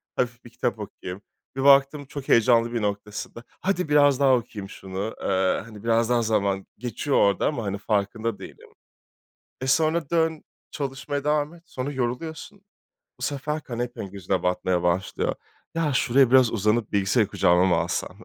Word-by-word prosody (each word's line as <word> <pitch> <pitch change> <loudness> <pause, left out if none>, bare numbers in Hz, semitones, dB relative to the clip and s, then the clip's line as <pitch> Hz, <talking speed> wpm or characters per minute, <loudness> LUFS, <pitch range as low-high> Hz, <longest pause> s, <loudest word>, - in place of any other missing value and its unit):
hafif 120 -1 -2
bir - - -11
kitap - - -2
okuyayım. 90 +2 -7 0.3
Bir 135 - -2
baktım 140 +1 +5
çok 140 0 -8
heyecanlı 115 0 +4
bir 115 - -1
noktasında, 105 +3 -4 0.2
hadi 180 -4 0
biraz 145 -2 +5
daha 135 -2 +5
okuyayım 110 -4 -5
şunu, 95 +3 -5
eee, 95 -1 +1
hani, 110 -2 -12
biraz 115 0 +2
daha 120 -1 +3
zaman, 100 -3 0
geçiyor 125 +4 -1
orada 100 -1 +3
ama, 125 -7 -2
hani, 100 0 -2
farkında 105 +2 -1
değilim. - - -12 0.9
E 130 - -3
sonra 155 +2 +2
dön 160 -2 +1 0.3
çalışmaya 140 0 -4
devam 150 +2 0
et, 170 - -17
sonra 135 -3 -4
yoruluyorsun. 155 +9 -4 0.6
Bu - - -16
sefer 150 +2 -2
kanepen 120 -5 -5
gözüne 95 -1 -2
batmaya 90 0 0
başlıyor. 90 +2 0 0.4
Ya 160 -3 0
şuraya 125 +1 +3
biraz 130 -3 +6
uzanıp 110 +1 +1
bilgisayarı 100 +2 +2
kucağıma 90 -2 +3
mı 90 -3 +3
alsam - - -2
120 Hz, 160 wpm, -25 LUFS, 100-140 Hz, 0.9 s, biraz